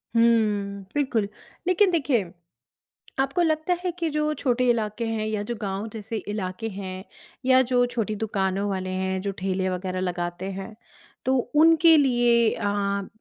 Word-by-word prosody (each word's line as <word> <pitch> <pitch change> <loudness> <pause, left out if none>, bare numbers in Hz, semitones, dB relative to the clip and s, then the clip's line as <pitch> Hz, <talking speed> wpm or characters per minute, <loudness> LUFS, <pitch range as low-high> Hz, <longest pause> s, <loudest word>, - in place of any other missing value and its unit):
हुँ 210 -4 +2
बिल्कुल। 260 -8 0 0.4
लेकिन 370 +1 +4
देखिए 260 - +1 0.9
आपको 275 +6 +1
लगता 315 +1 +1
है 360 - 0
कि 335 -1 0
जो 300 0 0
छोटे 250 -1 +1
इलाके 225 -1 0
हैं 225 -1 -2
या 215 -1 -1
जो 240 +3 -4
गाँव 200 +1 -3
जैसे 220 +1 -5
इलाके 205 +1 -3
हैं, 190 -2 -6 0.4
या 260 0 +6
जो 245 -1 +4
छोटी 230 -4 -2
दुकानों 200 -2 -1
वाले 185 -1 -3
हैं 190 0 -1
जो 200 +1 -2
ठेले 190 0 -1
वग़ैरह 185 0 -3
लगाते 175 0 -3
हैं 195 +3 -7 0.5
तो 260 +1 +3 0.2
उनके 325 +1 +7
लिए 240 -4 +4
अ 200 -1 -1
215 Hz, 150 wpm, -25 LUFS, 195-255 Hz, 0.9 s, उनके